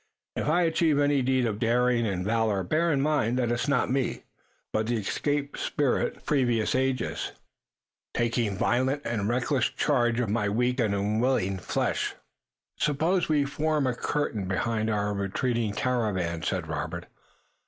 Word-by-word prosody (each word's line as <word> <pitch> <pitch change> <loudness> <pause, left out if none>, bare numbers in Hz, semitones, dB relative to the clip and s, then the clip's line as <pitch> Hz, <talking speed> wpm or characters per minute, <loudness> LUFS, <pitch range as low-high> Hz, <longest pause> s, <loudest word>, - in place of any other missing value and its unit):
If - - -2
I 170 +4 +3
achieve 165 -2 +2
any 145 -1 +3
deed 130 0 +2
of 105 -2 -2
daring 120 0 +2
and 90 -2 -2
valor 110 -3 +1
bear 165 - +1
in 140 -3 +1
mind 140 -5 +1
that 120 -2 +1
it's 120 +4 -1
not 140 -3 +1
me, 135 -1 -1 0.5
but 110 0 0
the 120 0 +1
escaped 145 +7 -2
spirit 145 -4 0
of - - -23
previous 120 -6 +1
ages 130 0 -1 0.8
taking 115 -4 0
violent 130 +6 +1
and 105 -3 -1
reckless 125 +1 +1
charge 120 -4 +1
of 125 - 0
my 105 0 0
weak 125 +5 0
and 105 -4 +2
unwilling 105 -1 +1
flesh." - - -1 0.6
"Suppose 160 +5 +1
we 150 -2 +3
form 150 +1 0
a 130 - +1
curtain 120 -6 -2
behind 110 +3 -1
our 105 -1 0
retreating 110 +3 -1
caravan," 100 -10 -1
said - - -2
Robert. - - -4
120 Hz, 155 wpm, -27 LUFS, 110-140 Hz, 0.8 s, I